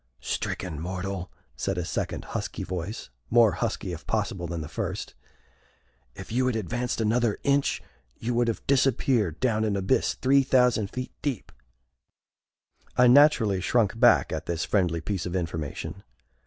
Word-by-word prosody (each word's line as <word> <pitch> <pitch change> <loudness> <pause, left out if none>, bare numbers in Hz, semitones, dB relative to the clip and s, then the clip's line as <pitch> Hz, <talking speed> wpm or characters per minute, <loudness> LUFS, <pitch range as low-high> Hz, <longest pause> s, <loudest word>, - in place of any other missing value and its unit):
"Stricken 85 -6 -3
mortal," 95 +2 -4 0.2
said 95 -2 -2
a 90 - -2
second - - -3
husky - - -3
voice, 90 - -5 0.2
more 115 -2 +6
husky, 90 - -3
if 80 - -9
possible, 100 -5 -1
than 85 -1 -4
the 75 - -6
first, - - -4 1.0
"if 95 +1 -9
you 130 +2 +1
had 125 - 0
advanced 120 +5 -2
another 115 0 +1
inch, 140 0 +1 0.3
you 120 +2 -2
would 120 0 +2
have 115 - -3
disappeared 130 - +2
down 110 -4 +1
an 105 -2 0
abyss 100 +6 +1
three 135 +1 +4
thousand 125 -6 +3
feet 125 +3 -5
deep!" 135 -8 -3 1.5
I 125 - +6
naturally 125 -7 +5
shrunk 115 +2 +1
back 120 -1 +5
at - - -4
this 85 -1 -1
friendly 90 -5 +1
piece 95 -1 -3
of 90 - -4
information. 85 +1 -4
105 Hz, 150 wpm, -26 LUFS, 90-125 Hz, 1.5 s, more